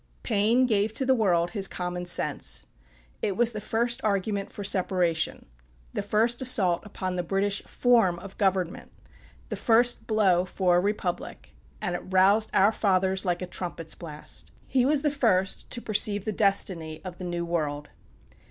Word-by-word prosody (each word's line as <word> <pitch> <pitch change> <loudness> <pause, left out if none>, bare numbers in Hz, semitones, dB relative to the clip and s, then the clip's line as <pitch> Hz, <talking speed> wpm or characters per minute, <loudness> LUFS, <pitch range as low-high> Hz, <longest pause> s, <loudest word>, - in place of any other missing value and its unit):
Paine 225 +3 +3
gave 215 -2 +1
to 265 - -1
the 265 - +4
world 175 -7 +1
his 200 -3 +1
"Common 180 0 -4
Sense." - - 0 0.6
It 195 -2 -1
was 240 -1 +3
the 215 -2 -6
first 235 +3 -1
argument 200 -1 -1
for 205 - -7
separation, 180 -4 +1 0.5
the - - -1
first 225 +4 +1
assault 195 -9 +2
upon 185 -3 -4
the - - +1
British 195 +3 0
form 230 -8 +2
of 195 +3 -10
government, 190 -3 0 0.6
the - - -3
first 240 +1 +2
blow 195 -5 +3
for 185 -1 +1
a - - +4
republic, 195 -2 -3 0.3
and 175 - -3
it - - -2
roused 195 +4 +3
our 200 +3 +4
fathers 190 -2 +1
like 175 0 -1
a - - -2
trumpet's 175 -2 -5
blast. 155 -4 -7
He 255 -2 +1
was 295 0 +2
the 295 - +2
first 205 -9 +1
to 240 - -3
perceive 205 -1 +1
the 215 - -1
destiny 185 -6 +1
of 180 -1 -8
the - - -6
New 175 -1 -3
World. 150 -4 -3
195 Hz, 165 wpm, -26 LUFS, 180-220 Hz, 0.6 s, the